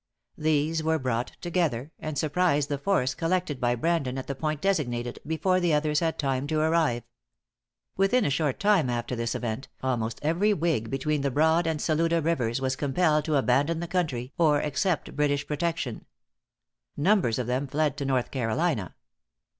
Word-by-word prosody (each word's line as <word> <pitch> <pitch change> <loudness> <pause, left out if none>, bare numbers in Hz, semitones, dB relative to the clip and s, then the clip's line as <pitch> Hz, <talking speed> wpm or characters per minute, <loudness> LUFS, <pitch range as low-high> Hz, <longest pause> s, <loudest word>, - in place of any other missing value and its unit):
These 155 +1 +1
were 160 0 +1
brought 125 -3 -2
together, 160 -6 -1
and 155 -2 -4
surprised 150 -1 +1
the 145 -1 -2
force 140 -6 +1
collected 165 -3 -1
by 120 0 +2
Brandon 140 -2 0
at 130 - -4
the 140 - -3
point 155 +2 -2
designated, 120 -11 -1
before 170 +4 +1
the 175 -4 +2
others 150 0 +1
had 165 -1 -1
time 135 -1 -1
to 155 0 0
arrive. 155 -7 +2 0.9
Within 195 +5 +3
a - - +1
short 145 -1 0
time 200 -10 +3
after 120 +1 -2
this 115 0 -2
event, 120 +2 -3 0.2
almost 115 -4 -1
every 185 +7 +2
whig 155 - 0
between 140 +3 -1
the 140 - +1
Broad 160 +5 +3
and 160 -2 -1
Saluda 165 +2 +1
rivers 135 -7 0
was 130 0 -1
compelled 150 +2 +1
to 155 - 0
abandon 140 +5 +2
the 170 - -4
country 140 -9 -2
or 150 -3 +4
accept 150 +4 -1
British 145 -1 +1
protection. 150 -5 -3 0.9
Numbers 165 - +2
of 125 - -1
them 130 +4 -1
fled 145 0 0
to 145 - -3
North 130 -2 0
Carolina. 120 - -1
150 Hz, 170 wpm, -27 LUFS, 130-165 Hz, 0.9 s, or